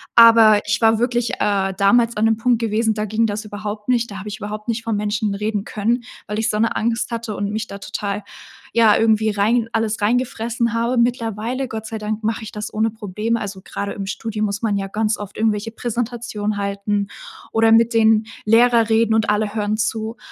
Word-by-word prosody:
Aber 230 -2 +8
ich 210 +1 0
war 225 0 +4
wirklich, 240 -1 0
äh, 195 -2 +1
damals 230 +4 +3
an 215 - +2
dem 225 -1 +3
Punkt 235 0 +2
gewesen, 220 0 +1
da 210 0 -2
ging 215 +2 +1
das 210 +1 -4
überhaupt 210 +1 -6
nicht. 235 -3 +1
Da 200 - -7
habe 200 - -8
ich 210 - -6
überhaupt 210 +1 -6
nicht 230 0 -2
vor 230 - -2
Menschen 205 0 -1
reden 210 0 -2
können, 230 +4 -1 0.2
weil 210 +1 -3
ich 220 - 0
so 210 - -1
'ne 230 - +1
Angst 230 +1 -1
hatte 230 -2 -4
und 200 0 -2
mich 220 +1 -3
da 200 - -8
total, 200 +1 -4 0.5
ja, 225 -2 +5
irgendwie 220 -1 +3
rein 220 +3 +1
alles 225 -1 -1
reingefressen 235 0 0
habe. 235 +2 0
Mittlerweile, 235 +1 -1
Gott 220 -2 -6
sei 225 - -5
Dank, 215 +1 -4
mache 225 +1 -1
ich 215 - -8
das 210 0 -6
ohne 220 +1 +1
Probleme. 220 +2 -2
Also 195 -2 -6
grade 200 0 -4
im 195 - -5
Studium 215 +2 -3
muss 200 +1 -3
man 210 -3 0
ja 195 0 -3
ganz 215 +2 -1
oft 205 -1 -8
irgendwelche 220 0 0
Präsentationen 230 -3 -3
halten 200 0 -1 0.4
oder 225 0 +3
mit 230 +1 +5
den 220 -1 +4 0.2
Lehrer 230 0 +4
reden 225 0 +3
und 220 -1 +1
alle 210 0 0
hören 210 -1 0
zu. 220 +1 -2
220 Hz, 205 wpm, -20 LUFS, 210-230 Hz, 0.5 s, Aber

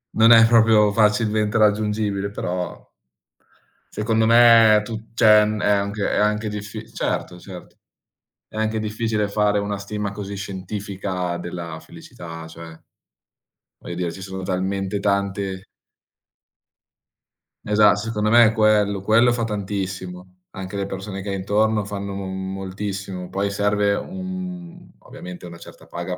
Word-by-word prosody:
Non 115 +1 +6
è 115 -1 +8
proprio 110 -2 +5
facilmente 105 0 +2
raggiungibile, 105 -1 +1
però 90 -3 -5 1.1
secondo 110 +1 +1
me 115 -1 +7
è - - +1
tu 110 0 -8
cioè 105 -3 +6
n 105 0 -2
è - - +1
anche 100 0 0
è - - -1
anche 105 +1 +1
diffi 105 +1 -7
certo, 90 - -3
certo. 90 0 -12 0.7
È - - -16
anche 110 0 0
difficile 110 0 -1
fare 105 0 +1
una 100 0 -3
stima 100 0 -4
così 100 0 -6
scientifica 95 -2 -4
della 85 -2 -6
felicità, 80 0 -11
cioè 80 0 -11 1.0
voglio 85 - -7
dire 85 -1 -2
ci 95 - -10
sono 95 0 -6
talmente 95 +1 -2
tante 100 -1 -2 2.0
Esa 105 -1 +5
secondo 105 0 -2
me 120 0 +7
è 110 - +2
quello, 105 -3 +2
quello 115 +4 +4
fa 120 -1 -2
tantissimo. 95 -3 -5 0.2
Anche 95 +1 -7
le 100 - -1
persone 95 0 -6
che 100 - -6
hai 100 - -2
intorno 105 +2 +1
fanno 100 -1 -5
m 95 -1 -5
moltissimo. 95 -1 -5
Poi 100 +1 -2
serve 100 0 +1
un 180 -1 -7
ovviamente 90 0 -10
una 85 -1 -10
certa - - -14
paga 85 +1 -5
100 Hz, 140 wpm, -22 LUFS, 95-110 Hz, 2.0 s, è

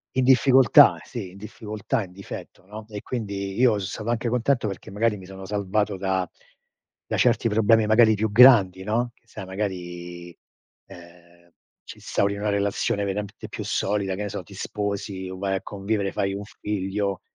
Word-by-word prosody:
In 130 - +2
difficoltà, 130 -2 +6
sì, 100 -6 -7
in 95 - -14
difficoltà, 105 +1 -4
in 90 - -12
difetto, 95 -1 -10
no, 105 +2 -9
e 105 -2 -7
quindi 100 -5 -4
io 120 -5 +4
so 95 - -3
stato 110 +4 -5
anche 120 0 0
contento 125 0 +1
perché 95 -2 -7
magari 105 +2 0
mi 95 - -11
sono 95 0 -10
salvato 105 0 -1
da 95 -1 -1 0.8
da - - -1
certi - - +3
problemi 110 +1 +4
magari 110 0 +5
più 110 +2 -1
grandi, 105 -6 +7
no, 120 +4 -1
che 120 - -37
sai, 95 - -8
magari 90 -3 -6 0.5
eh, 85 0 -17 0.3
ci - - -11
instauri 100 0 -1
una 105 +1 -2
relazione 100 0 0
veramente 100 +1 -5
più - - -6
solida, 100 -1 -1
che 105 - -4
ne 105 - -4
so, 100 -2 -5
ti 100 - -15
sposi 100 -2 -4
o 95 - -7
vai 95 0 -1
a 95 - -3
convivere, 100 0 -2
fai 95 0 -1
un 100 +1 -5
figlio 100 -1 -3
100 Hz, 175 wpm, -24 LUFS, 95-110 Hz, 0.8 s, grandi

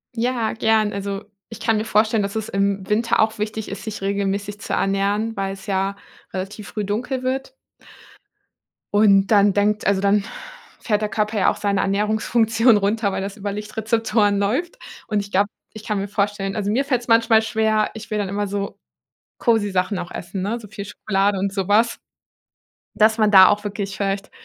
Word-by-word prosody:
Ja, 235 -1 0
gern. 220 -1 +2
Also 200 0 -4 0.3
ich 225 - -9
kann 225 -1 +1
mir 215 - -2
vorstellen, 215 0 +2
dass 200 +1 -4
es 220 -1 -2
im 195 -1 -1
Winter 230 +2 +1
auch 220 0 +2
wichtig 215 0 -3
ist, 195 - -7
sich 215 -3 -6
regelmäßig 200 +1 -2
zu - - -4
ernähren, 200 +3 0
weil's 195 -1 -4
ja 195 -1 -1 0.4
relativ 195 +1 -6
früh 210 +1 -3
dunkel 250 +6 -2
wird. 265 - -3 1.4
Und 200 -2 +5
dann 205 -2 +4
denkt 205 +1 +1
also, 195 -1 +2
dann 200 0 +3 0.6
fährt 210 -2 0
der 210 - -1
Körper 215 +1 -1
ja - - +4
auch - - -1
seine 200 -1 0
Ernährungsfunktion 220 +3 +2
runter, 205 +1 0
weil 190 - -3
das 195 0 -6
über 205 0 -4
Lichtrezeptoren 215 0 0
läuft. 250 - -1 0.3
Und 215 -2 0
ich 200 0 -6
glaube 200 +2 +3 0.3
ich 215 - -9
kann 210 -2 -2
mir 195 +1 -2
vorstellen 205 -1 -1
also, 205 -2 -2
mir 265 +6 +1
fällt 255 -4 0
es 240 - -13
manchmal 230 -1 +5
schwer 220 -1 +1
ich 220 0 -9
will 210 - 0
dann 200 -2 -2
immer 205 +1 -1
so 200 0 -4 0.6
cozy 220 -4 +1
Sachen 185 +2 0
auch 175 - -6
essen, 180 +2 -6
ne, 215 +5 -2
so 220 - -12
viel 205 0 -7
Schokolade 200 -1 0
und 195 +1 -1
sowas. 205 +4 +2 1.0
Dass 220 +1 +4
man 215 -2 +3
da 190 -2 +9
auch 210 0 0
wirklich 200 -1 -4
vielleicht 195 0 -2
205 Hz, 185 wpm, -21 LUFS, 200-220 Hz, 1.4 s, da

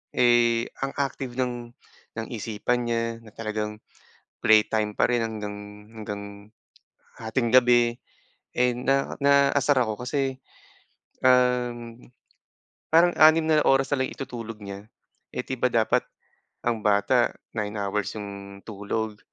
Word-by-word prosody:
eh, 120 -1 +4 0.2
ang 135 0 -3
active 135 -3 -3
ng 120 -2 -2 0.5
ng 115 - -3
isipan 115 +2 -2
niya, 115 0 0 0.2
na 110 - -14
talagang 105 -1 -4 0.6
playtime 110 -1 +3
pa - - +3
rin 120 -1 +2
hanggang 105 -2 -5 0.4
hanggang 105 -2 -6 0.9
hating 115 +2 -1
gabi. 120 -1 +5 0.6
And, 125 0 +1
na 135 0 +1
naaasar 140 0 +4
ako 110 +2 -4
kasi, 135 -1 -2 0.8
um, 125 -2 +2 0.9
parang 170 +2 +5
6 155 +1 +7
na 155 -1 +4
oras 135 +1 +3
na 130 -2 +2
lang - - -4
itutulog 115 -4 -6
niya, 100 +1 -9 0.5
eh, - - -2
di 130 - -2
ba 125 - +2
dapat 115 -2 +2 0.6
ang 115 -2 0
bata 105 +4 +3 0.2
9 105 0 -2
hours 100 +1 -2
yung 100 -1 -8
tulog. 105 +1 -4
120 Hz, 125 wpm, -25 LUFS, 105-130 Hz, 0.9 s, 6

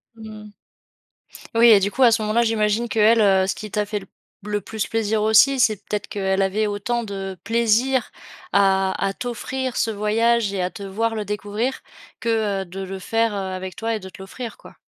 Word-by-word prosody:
Mmh. 215 -1 -11 1.0
Oui 235 +1 +7
et 210 -3 +8
du 200 +1 0
coup, 265 - +1
à 235 - +7
ce 225 0 +2
moment-là, 215 +3 +2
j'imagine 220 +1 +1
qu'elle, 225 +1 +4
heu, 190 -2 +4
ce - - -1
qui 215 -1 -8
t'a 210 0 0
fait 210 0 -3
l 195 - -13 0.4
le 210 -1 -2
plus 220 -2 -4
plaisir 220 -1 0
aussi, 220 +5 +5
c'est 220 -3 +4
peut-être 205 +1 -5
qu'elle 190 -1 -1
avait 200 +3 +1
autant 230 +4 -2
de 195 -2 -5
plaisir 235 +3 +1 0.4
à 195 -1 +3
à 195 - 0
t'offrir 255 +2 -4
ce 225 - 0
voyage 215 +1 +1
et 190 - -1
à 180 - 0
te 210 0 -11
voir 225 +4 -1
le 210 -1 -3
découvrir 210 +5 -3 0.4
que, 215 -4 0
heu, - - -6
de 185 +3 -9
le 190 0 -6
faire, 225 +2 0
heu, - - -4
avec 185 -1 -5
toi 225 0 -2
et - - -4
de 190 - -10
te 190 - -13
l'offrir, 230 +5 -7
quoi. - - -16
215 Hz, 205 wpm, -22 LUFS, 195-230 Hz, 1.0 s, et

